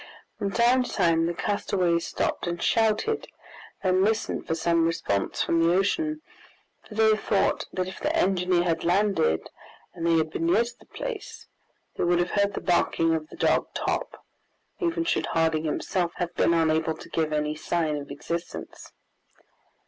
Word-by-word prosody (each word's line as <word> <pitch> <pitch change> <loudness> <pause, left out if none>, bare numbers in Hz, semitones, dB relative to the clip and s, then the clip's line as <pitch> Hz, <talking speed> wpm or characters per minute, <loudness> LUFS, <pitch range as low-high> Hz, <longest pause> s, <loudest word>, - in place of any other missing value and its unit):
From 200 -2 -1
time 240 +5 +3
to 250 - -4
time 165 -3 +2
the 170 - -1
castaways 180 -3 0
stopped - - -2
and 170 0 -2
shouted, 225 - +1 0.6
then 185 0 +3
listened 220 +2 -1
for 160 - 0
some 170 0 +2
response 100 -12 -1
from 165 0 +1
the 170 +1 +4
ocean, 310 - 0 0.6
for 215 - -12
they 220 0 +5
thought 205 -1 0
that 185 0 -2
if 185 - -8
the - - -1
engineer 180 -2 +2
had 165 -2 0
landed, 180 - +2 0.5
and 170 -1 -3
they 165 -1 +4
had 155 -1 0
been 165 - -1
near 210 +7 +4
to 240 +1 -10
the - - -20
place, 470 -5 -6 0.5
they - - 0
would 175 0 +3
have 175 0 0
heard 200 -1 +1
the - - -3
barking 165 -2 +2
of 155 -1 -3
the - - -11
dog - - +2
Top, - - -3 0.5
even 335 -3 0
should 340 - 0
Harding 160 -1 +1
himself 170 +3 -1
have 175 -1 -3
been 170 - +2
unable 160 -1 +1
to - - -11
give 160 -2 -1
any 150 0 0
sign 155 -1 -1
of 140 - -7
existence. 170 +4 -6
175 Hz, 170 wpm, -26 LUFS, 165-205 Hz, 0.6 s, they